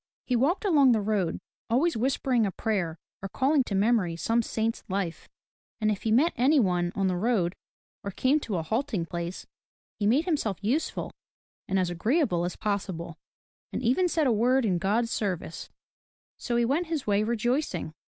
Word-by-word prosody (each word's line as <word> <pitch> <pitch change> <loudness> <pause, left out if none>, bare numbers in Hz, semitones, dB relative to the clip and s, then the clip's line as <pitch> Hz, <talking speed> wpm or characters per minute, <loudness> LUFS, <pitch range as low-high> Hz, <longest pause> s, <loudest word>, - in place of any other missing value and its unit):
He 250 - 0
walked 295 - +1
along 285 -9 +5
the 220 - +2
road, 200 -5 0 0.3
always 295 +9 +2
whispering 250 0 +1
a - - -2
prayer 175 -4 -2 0.2
or 195 - -5
calling 275 +4 +2
to 200 - -3
memory 200 -4 +2
some 230 +7 +1
saint's 225 0 -2
life. 185 -3 -3 0.5
And 215 -1 +2
if 200 - -3
he 220 - -1
met 280 +10 +4
any 275 +5 +4
one 180 -5 +1
on 195 - 0
the 185 -1 +1
road 185 -3 +1 0.5
or 200 - -3
came 260 +9 +2
to 225 -8 -4
a 165 - -1
halting 220 - -1
place, 170 +1 -5 0.5
he 205 - +1
made 265 +9 +3
himself 285 - -1
useful 265 +10 -1 0.6
and 195 - 0
as 180 -2 +1
agreeable 180 - +1
as 180 - -4
possible, 185 -5 -3 0.5
and - - -4
even 260 +10 +3
said 325 -3 +1
a 255 - +3
word 245 +4 +3
in 180 -4 +1
God's 225 +6 0
service. 185 -5 -3 0.7
So 240 - -2
he 235 0 +3
went 305 +8 0
his 320 -4 -3
way 205 0 +2
rejoicing. 235 - -1
220 Hz, 180 wpm, -27 LUFS, 185-260 Hz, 0.7 s, along